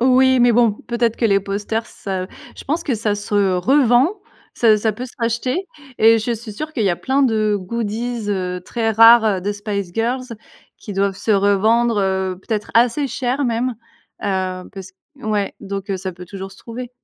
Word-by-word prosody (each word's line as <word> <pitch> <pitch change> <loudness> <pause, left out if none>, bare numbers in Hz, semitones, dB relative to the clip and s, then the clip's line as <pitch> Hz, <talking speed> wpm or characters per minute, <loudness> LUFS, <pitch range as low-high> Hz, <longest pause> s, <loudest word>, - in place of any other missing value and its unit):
Oui 260 +1 +4
mais 240 0 +5
bon 230 -1 +4
peut-être 235 +1 -2
que 235 - -2
les 200 -2 +4
posters 205 +3 -3
ça 190 -2 -5 0.3
je - - -10
pense 315 +5 -1
que 270 - -1
ça 210 -1 -1
se 205 -2 0
revend, 250 - +4 0.5
ça 220 -3 +4
ça 215 +1 0
peut 245 +5 -6
se 255 - -14
racheter 255 - -1 0.3
et 225 +1 +6
je 225 +2 -2
suis 225 -1 -7
sûr 310 +9 -6
qu'il 230 -8 -1
y 195 - +3
a 175 - -1
plein 270 +7 0
de 215 -4 +2
goodies, 230 +3 -3
heu, 180 -2 -2
très 225 +1 -1
rares, 230 +1 +7
heu, 200 -4 +1
de 205 +3 -2
Spice 200 -3 -4
Girls 245 +2 -2 0.4
qui 210 - -8
doivent 195 0 0
se 205 +3 -3
revendre, 210 +3 +3
heu, 190 -1 -1
peut-être 210 0 -3
assez 245 +5 +3
cher 265 +1 -2
même, 240 +1 -1 0.5
heu, 185 -2 -2
pass 190 -2 -10 0.2
ouais 215 -6 -2
donc, 200 0 -5
heu, 195 - 0
ça 190 0 -5
peut 180 +1 -11
toujours 195 +1 -8
se - - -16
trouver. 240 +1 -8
220 Hz, 195 wpm, -19 LUFS, 195-240 Hz, 0.5 s, rares